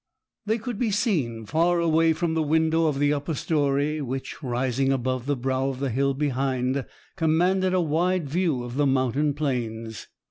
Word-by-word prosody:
They 220 +2 +2
could 235 -1 -5
be 240 - +1
seen 150 - 0
far 170 +7 +2
away 165 -1 +3
from 165 0 -1
the 160 - +1
window 160 +1 +2
of 150 -3 0
the 145 +1 +2
upper 145 +2 -2
storey, 145 0 0
which, 135 +2 -5
rising 130 +1 0
above 130 -1 -1
the 145 - +1
brow 130 +1 -1
of 130 -1 -5
the 135 -2 -1
hill 135 +3 +1
behind, 135 -1 -1 0.3
commanded 180 +3 +2
a 185 - +3
wide 170 +1 0
view 155 -4 0
of 120 +2 -6
the 145 -1 +3
mountain 135 +2 +1
plains. 115 -6 -3
145 Hz, 175 wpm, -25 LUFS, 130-165 Hz, 0.3 s, away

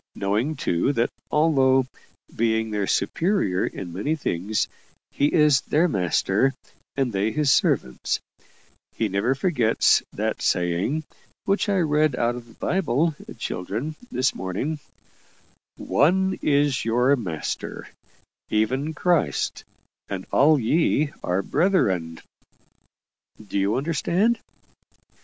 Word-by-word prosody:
Knowing, 110 +10 0
too, 90 - 0
that 115 -2 0 0.2
although, 135 -4 +3 0.5
being 110 -1 0
their 105 -2 -1
superior 165 - +1
in 90 -3 -7
many 125 - -1
things, 105 - -1 0.4
he 145 +1 +1
is 150 -5 +4
their 165 +4 +2
master 100 - +1 0.4
and 130 -4 0
they 100 +3 0
his 150 0 +3
servants, 65 -1 0 0.7
he 110 - -1
never 100 +7 0
forgets 135 -7 +3
that - - -3
saying, 90 - 0 0.4
which 200 +2 +1
I 200 - +2
read 155 -4 +2
out 120 0 +1
of 120 -1 -9
the 115 - -18
Bible, 165 -3 0 0.2
children, 125 - -4 0.2
this 130 +1 +1
morning: 95 - -3 1.0
'ONE 190 +6 +2
IS 145 -2 +2
YOUR 125 +5 +3
MASTER 90 - -5 0.6
EVEN 130 +9 0
CHRIST, 160 - 0 0.5
AND 95 -2 -4
ALL 150 +1 +5
YE 150 +3 +1
ARE 90 +2 0
BRETHREN.' 95 - +1 1.3
Do 100 - -1
you 100 +2 +1
understand?" 170 - +1
130 Hz, 110 wpm, -24 LUFS, 100-155 Hz, 1.3 s, ALL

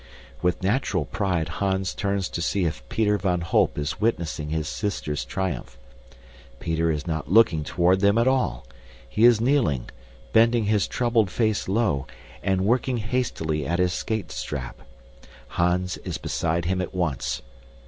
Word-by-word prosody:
With 90 +1 0
natural 100 - +1
pride 90 -3 -1
Hans 95 +2 -1
turns 100 -2 -1
to 85 - -4
see 90 +2 +1
if 80 -7 -2
Peter 105 -2 +1
van 90 -2 0
Holp 85 - +2
is 70 +4 -3
witnessing 85 -8 -1
his 80 0 -2
sister's 75 -10 -2
triumph. 85 -5 -4 0.8
Peter 80 0 0
is 75 -3 -1
not 80 -2 -3
looking 95 -8 +5
toward 90 +4 +2
them 100 +2 +4
at 120 +2 +3
all. 125 - +1 0.4
He 105 - +3
is 120 -2 +6
kneeling, 115 - +1 0.4
bending 115 +1 +5
his 105 -1 +2
troubled 115 -5 +1
face 110 +1 0
low, 95 - +1 0.3
and 95 0 +1
working 125 +3 +1
hastily 105 - -1
at 85 - 0
his 90 -1 +2
skate 110 +1 -3
strap. - - -5 0.7
Hans 90 +1 0
is - - -5
beside 85 0 -1
him 95 +1 0
at 90 - -5
once. 85 -7 -1
95 Hz, 150 wpm, -25 LUFS, 80-110 Hz, 0.8 s, is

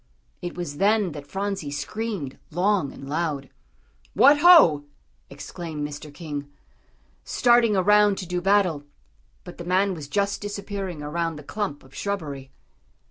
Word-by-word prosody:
It 175 -1 -5
was 165 -5 -5
then 205 -1 +2
that 145 -1 -9
Phronsie 195 -3 -3
screamed 145 - -4
long 180 -3 +1
and 135 - -11
loud. 145 -3 -2 0.6
"What 280 +7 +6
ho!" 295 - +7 0.4
exclaimed 155 -4 -6
Mr. 150 0 -9
King, 145 -2 -7 0.7
starting 240 -3 +3
around 205 +1 +4
to 185 - -5
do 180 0 -3
battle; 185 -6 +2 0.6
but - - -11
the - - -5
man 185 +3 +1
was 155 -5 -7
just 200 +4 -1
disappearing 200 -5 -5
around 165 +2 -2
the 150 - -10
clump 195 -3 -4
of 130 0 -19
shrubbery. 145 -10 -4
175 Hz, 135 wpm, -24 LUFS, 145-200 Hz, 0.7 s, ho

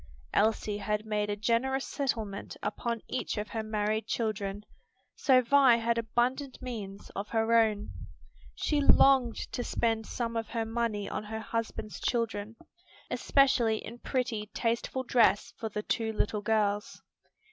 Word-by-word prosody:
Elsie 215 -1 +1
had 210 +1 -2
made 210 -1 -1
a 205 - 0
generous 235 +5 0
settlement 225 -8 -3
upon 235 -2 -2
each 255 - -3
of 210 0 -3
her 225 - -2
married 215 0 -1
children; 210 -3 -2 0.5
so 260 -3 +4
Vi 265 -1 +6
had 230 0 +1
abundant 245 +4 -1
means 205 -6 -7
of 200 +2 -5
her 225 0 +1
own. 215 -2 +2 0.6
She 295 -2 0
longed 265 -4 +5 0.2
to 245 - -3
spend 225 -2 0
some 230 -1 -3
of 225 -1 -2
her 230 -1 -2
money 225 -3 -1
on 210 - -4
her 220 +1 -5
husband's 220 -2 -4
children, 225 -3 -1 0.6
especially 250 -5 +3
in 235 +2 -8
pretty, 240 -6 -2
tasteful 235 +2 -1
dress 225 -6 +3
for 220 - -3
the 210 0 -4
two 225 0 -1
little 210 -1 -1
girls. 210 -1 0
225 Hz, 145 wpm, -30 LUFS, 210-240 Hz, 0.6 s, Vi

